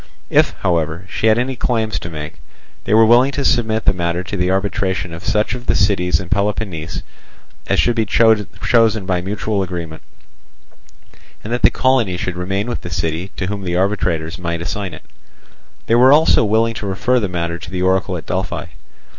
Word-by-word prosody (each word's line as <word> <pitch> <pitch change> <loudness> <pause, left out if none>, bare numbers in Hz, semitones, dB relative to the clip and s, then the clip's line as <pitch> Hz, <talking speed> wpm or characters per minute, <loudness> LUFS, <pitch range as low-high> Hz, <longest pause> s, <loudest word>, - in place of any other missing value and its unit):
If, - - +3
however, 85 0 -1
she 110 - -1
had 110 0 +4
any 130 +2 -1
claims 115 -3 -1
to 85 - -7
make, 75 -1 -8 0.4
they 105 - 0
were 110 0 +7
willing 120 +4 +5
to 140 +1 -2
submit 110 -2 +1
the - - +4
matter 85 0 -2
to 95 - -6
the 90 -1 0
arbitration 95 -3 -1
of 85 - -8
such 105 +2 0
of 125 0 -7
the - - +2
cities 90 -5 +2
in 90 - -7
Peloponnese 100 -4 -2 0.6
as - - +1
should 120 - +2
be 110 -2 0
chosen 110 0 +2
by 90 -2 0
mutual 100 +2 -2
agreement, 85 -4 -5 1.4
and 110 - -4
that 120 - -1
the - - +7
colony 120 -8 +1
should 90 0 -3
remain 95 +3 -2
with 120 - -3
the 90 - -7
city 85 +1 -2
to 95 - -2
whom 100 +1 -4
the 90 -2 -2
arbitrators 90 -4 -1
might 85 -1 -3
assign 95 -2 -4
it. - - -14 0.8
They - - 0
were 125 +3 +6
also 155 -4 +5
willing 110 +2 +2
to 100 - -4
refer 125 +6 +1
the 100 -4 -2
matter 85 -1 -3
to - - -9
the 90 0 -3
oracle 95 0 +1
at 80 - -9
Delphi. 95 -1 -3
95 Hz, 190 wpm, -18 LUFS, 90-110 Hz, 1.4 s, were